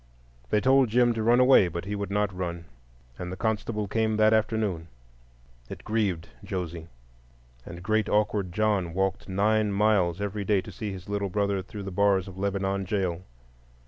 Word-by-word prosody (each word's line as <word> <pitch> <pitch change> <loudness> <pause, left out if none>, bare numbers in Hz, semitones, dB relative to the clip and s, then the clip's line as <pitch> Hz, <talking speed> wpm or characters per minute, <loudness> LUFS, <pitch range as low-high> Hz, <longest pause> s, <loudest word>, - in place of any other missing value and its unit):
They 105 - +3
told 130 +1 +4
Jim 120 +1 +3
to 115 - -3
run 120 +3 +4
away; 125 -7 +6
but 85 +1 -5
he 100 - -4
would 100 -1 -4
not 100 -1 0
run, 85 -2 -4 0.5
and 90 0 -5
the 95 - -6
constable 105 -1 -2
came 110 +1 0
that 110 0 +5
afternoon. 105 -6 0 0.8
It - - -8
grieved 100 -7 -1 0.2
Josie, 85 -3 -5 0.8
and 85 0 -9
great 110 +1 +1
awkward 105 -3 +1
John 100 -4 0
walked 95 +1 -1
nine 105 +2 +2
miles 100 -4 +2
every 100 0 -3
day 100 0 +2
to - - -10
see 105 -2 -5
his 95 -2 -9
little 100 -1 -2
brother 100 0 0
through 100 +2 -8
the 95 - -6
bars 100 0 +2
of 95 - -9
Lebanon 100 0 -1
jail. 90 -3 -1
100 Hz, 175 wpm, -27 LUFS, 95-110 Hz, 0.8 s, away